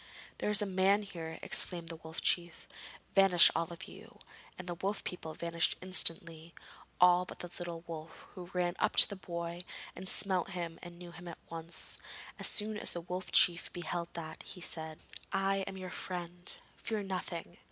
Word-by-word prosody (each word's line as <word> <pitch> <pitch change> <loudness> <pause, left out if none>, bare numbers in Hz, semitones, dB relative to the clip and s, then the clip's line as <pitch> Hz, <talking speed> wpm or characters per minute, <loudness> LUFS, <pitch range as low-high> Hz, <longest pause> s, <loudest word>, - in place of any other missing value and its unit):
'There - - 0
is 210 0 +8
a - - -1
man 195 +2 +3
here,' 165 -5 -7
exclaimed 170 -2 +2
the 165 - -5
Wolf 160 0 -7
Chief. 175 -1 0 0.5
'Vanish 195 -3 +7
all 165 0 -1
of 170 - -7
you!' 225 +5 -12 0.4
and 180 - -8
the 175 - -2
wolf 195 +4 -2
people 160 -3 -6
vanished 170 -1 0
instantly, 165 -3 +1 0.4
all 180 0 +6
but - - -9
the 175 - -7
little 170 -1 -5
wolf, 160 -1 -8
who 180 -1 -8
ran 180 -1 0
up - - +1
to - - +11
the 200 - -6
boy 170 -1 -5 0.3
and 190 - -5
smelt 190 -3 +2
him 170 -2 -4
and 175 -1 -10
knew 175 0 -10
him 175 +1 -11
at 170 - -7
once. 165 0 -3 0.4
As - - +3
soon 210 0 +4
as - - +4
the 175 - -4
Wolf 180 +2 -5
Chief 175 -1 +4
beheld 175 0 -3
that, 160 -2 -7
he 185 - -9
said: 160 -2 -1 0.4
'I 195 0 +2
am 190 - -6
your 185 -1 -6
friend; 175 -1 -4 0.3
fear 220 -2 -2
nothing. 180 -3 -5
175 Hz, 185 wpm, -33 LUFS, 170-185 Hz, 0.5 s, to